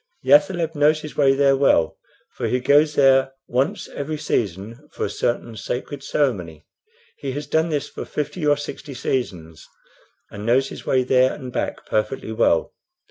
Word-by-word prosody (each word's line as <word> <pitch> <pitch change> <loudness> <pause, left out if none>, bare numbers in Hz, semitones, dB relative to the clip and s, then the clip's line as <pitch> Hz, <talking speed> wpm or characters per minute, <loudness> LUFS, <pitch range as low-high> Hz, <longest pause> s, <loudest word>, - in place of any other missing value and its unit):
The - - -1
athaleb 180 - +4
knows 150 0 +3
his 150 - -9
way 135 -2 +4
there 135 0 +4
well, 140 +1 +2 0.3
for - - -3
he 125 - +1
goes 145 +4 +3
there 135 -1 +4
once 130 +3 -1
every 155 +2 -4
season 115 - -3
for - - -3
a 100 - -4
certain 120 +1 -2
sacred 125 +7 -5
ceremony. 90 - -2 0.5
He 135 -2 -4
has 145 +2 -4
done 160 +1 +1
this 150 -3 -2
for - - -7
fifty 150 +3 -4
or 145 -1 +3
sixty 145 -1 -7
seasons, 90 - -4 0.6
and 100 - -8
knows 130 +4 +2
his - - -10
way 130 -1 +3
there 130 0 +3
and 130 -3 -8
back - - -3
perfectly 110 +2 -2
well. 110 +1 +1
135 Hz, 170 wpm, -22 LUFS, 120-145 Hz, 0.6 s, athaleb